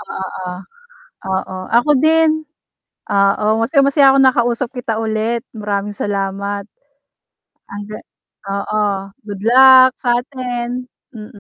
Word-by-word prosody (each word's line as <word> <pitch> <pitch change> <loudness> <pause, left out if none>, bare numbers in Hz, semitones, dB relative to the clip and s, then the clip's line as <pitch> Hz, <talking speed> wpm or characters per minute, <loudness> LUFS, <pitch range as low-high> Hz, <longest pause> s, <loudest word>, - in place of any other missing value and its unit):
oo. 185 -1 -6 0.7
Oo, 190 0 -3 0.2
ako 245 +6 +3
din, 315 +1 +2 0.7
oo, 200 +1 +2
masayang-masaya 275 +2 +3
ako - - +3
nakausap 245 -1 +1
kita 245 -3 -4
ulit, 220 +1 -2
maraming 205 -2 -4
salamat 200 0 -3 1.0
ang 205 +1 -8
ga 215 - -7 0.5
oo, 200 +2 -2 0.4
good 200 -2 -7
luck 260 +3 +7
sa'tin, 245 0 -3 0.3
mm. 215 0 -11
230 Hz, 100 wpm, -17 LUFS, 205-260 Hz, 1.0 s, luck